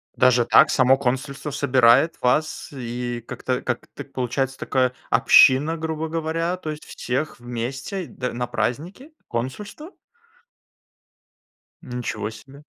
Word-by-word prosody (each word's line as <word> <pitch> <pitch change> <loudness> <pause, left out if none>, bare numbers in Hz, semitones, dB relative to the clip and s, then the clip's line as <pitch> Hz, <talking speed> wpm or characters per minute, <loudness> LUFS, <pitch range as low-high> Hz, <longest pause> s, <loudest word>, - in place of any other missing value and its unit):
Даже 125 -2 +4
так, - - +6
само 130 +1 +4
консульство 140 +3 -3
собирает 130 +3 +4
вас, 140 +5 0
и 120 -2 -5
как-то 125 0 -3
как-то - - -5
получается 130 +1 -3
такая 130 -2 0 0.2
община, 150 +5 +5
грубо 160 0 -3
говоря. 165 +2 -2
То 155 -4 -5
есть 150 - -8
всех 130 +2 -4
вместе 130 - -5
д 125 +1 -5
на 120 0 -3
праздники? 165 - -3 0.2
Консульство? 205 - -5 1.9
Ничего 120 -4 -4
себе. 135 +6 -14
130 Hz, 115 wpm, -23 LUFS, 125-155 Hz, 1.9 s, так